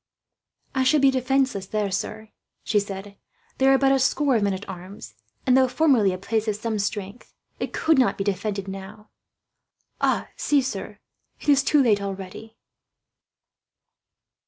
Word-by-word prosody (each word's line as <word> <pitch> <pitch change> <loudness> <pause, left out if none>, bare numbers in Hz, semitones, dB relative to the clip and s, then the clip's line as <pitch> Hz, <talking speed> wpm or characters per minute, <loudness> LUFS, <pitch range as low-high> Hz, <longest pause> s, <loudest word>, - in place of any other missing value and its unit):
"I 265 - +1
should 280 +2 +3
be 275 - +6
defenceless 260 -6 0
there, 210 -1 -1
sir," 215 +3 -4 0.3
she 210 - +2
said. 200 0 -7 0.4
"There 265 0 +5
are 270 - +6
but 270 0 +3
a 270 - +3
score 275 +1 +2
of 220 - +2
men 200 -1 +1
at 190 - -9
arms 185 +2 -9 0.3
and, 255 -2 +4
though 260 0 +5
formerly 255 -7 +3
a 185 - -4
place 220 +3 -2
of 210 - 0
some 220 0 -3
strength, 200 +2 -5 0.2
it - - -3
could 320 -3 +2
not 255 - +2
be 195 - -1
defended 200 0 -2
now. 195 +2 -9 1.3
See, 285 -2 +2
sir, 260 - -5 0.4
it - - -4
is 280 -1 +6
too 285 +1 +3
late 210 -4 +3
already." 195 +3 -7
215 Hz, 160 wpm, -24 LUFS, 200-265 Hz, 1.3 s, be